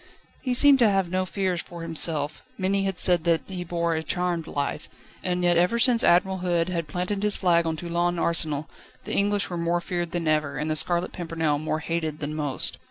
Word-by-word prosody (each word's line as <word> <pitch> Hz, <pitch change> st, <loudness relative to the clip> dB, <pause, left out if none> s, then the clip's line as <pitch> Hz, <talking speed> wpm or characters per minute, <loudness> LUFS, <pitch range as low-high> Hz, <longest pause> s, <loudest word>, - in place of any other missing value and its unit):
He 255 Hz, -2 st, -1 dB
seemed 280 Hz, +1 st, +6 dB
to 230 Hz, -3 st, +5 dB
have 195 Hz, -3 st, 0 dB
no 185 Hz, 0 st, -1 dB
fears 185 Hz, -3 st, -1 dB
for 170 Hz, -1 st, -10 dB
himself; 155 Hz, -2 st, -2 dB, 0.2 s
many 195 Hz, +1 st, 0 dB
had 195 Hz, -2 st, -2 dB
said 175 Hz, -3 st, +4 dB
that 165 Hz, -2 st, +2 dB
he 185 Hz, -2 st, -6 dB
bore 170 Hz, -1 st, -1 dB
a 160 Hz, -, -1 dB
charmed 175 Hz, -1 st, -2 dB
life; 140 Hz, 0 st, -3 dB, 0.3 s
and 180 Hz, -1 st, -1 dB
yet 175 Hz, -1 st, +3 dB
ever 180 Hz, +7 st, +2 dB
since 235 Hz, -1 st, +5 dB
Admiral 190 Hz, +2 st, +3 dB
Hood 175 Hz, -1 st, 0 dB
had 170 Hz, -3 st, -3 dB
planted 180 Hz, +6 st, -3 dB
his 210 Hz, -1 st, +1 dB
flag 170 Hz, -3 st, +2 dB
on 160 Hz, -1 st, -2 dB
Toulon 175 Hz, +1 st, -1 dB
Arsenal, 160 Hz, -3 st, +1 dB, 0.4 s
the -, -, -6 dB
English 205 Hz, -1 st, 0 dB
were 175 Hz, -, -3 dB
more 170 Hz, +1 st, 0 dB
feared 175 Hz, -1 st, -3 dB
than 170 Hz, -1 st, -3 dB
ever, 150 Hz, -2 st, 0 dB
and 150 Hz, +3 st, -2 dB
The -, -, 0 dB
Scarlet 175 Hz, +3 st, +2 dB
Pimpernel 160 Hz, -4 st, -2 dB
more 155 Hz, +1 st, -2 dB
hated 160 Hz, -2 st, -3 dB
than 150 Hz, 0 st, -4 dB
most. 150 Hz, -3 st, 0 dB
175 Hz, 210 wpm, -25 LUFS, 160-185 Hz, 0.4 s, seemed